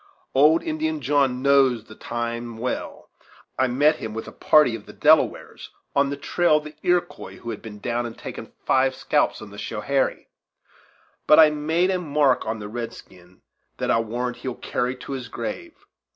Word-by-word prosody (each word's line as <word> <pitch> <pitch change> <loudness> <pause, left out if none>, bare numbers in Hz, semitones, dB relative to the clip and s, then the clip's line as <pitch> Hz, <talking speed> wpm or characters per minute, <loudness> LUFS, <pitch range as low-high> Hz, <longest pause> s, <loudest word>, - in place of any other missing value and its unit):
Old 150 +5 +5
Indian 315 0 -2
John 135 - +1
knows 135 -5 +4
the 110 - -14
time 120 0 -5
well. 125 +3 -5 0.5
I 130 - +3
met 145 +5 +3
him 110 -1 -6
with 110 - -5
a - - -8
party 150 -6 +4
of 105 - -10
the - - -11
Delawares, - - +2 0.3
on 140 0 +3
the 140 - -4
trail 155 +2 +2
of 150 - -4
the 150 0 -10
Iroquois, 175 0 -1
who 120 - -6
had 110 - -7
been 110 -2 -9
down 120 +3 -2
and 115 - -10
taken - - -8
five 130 0 +2
scalps - - 0
on 105 - -11
the 100 - -10
Schoharie. 135 +5 -1 1.0
But 150 - +7
I 155 -1 +8
made 160 +5 +1
a 185 - 0
mark 145 -7 +1
on 110 +1 -2
the 105 -1 -7
red 115 +1 -5
skin 90 0 -17 0.3
that - - -1
I'll 115 - +2
warrant 120 +2 -3
he'll 125 0 -5
carry 125 +1 -2
to 130 - -10
his 130 -2 -5
grave! 325 +5 -6
130 Hz, 185 wpm, -23 LUFS, 115-150 Hz, 1.0 s, I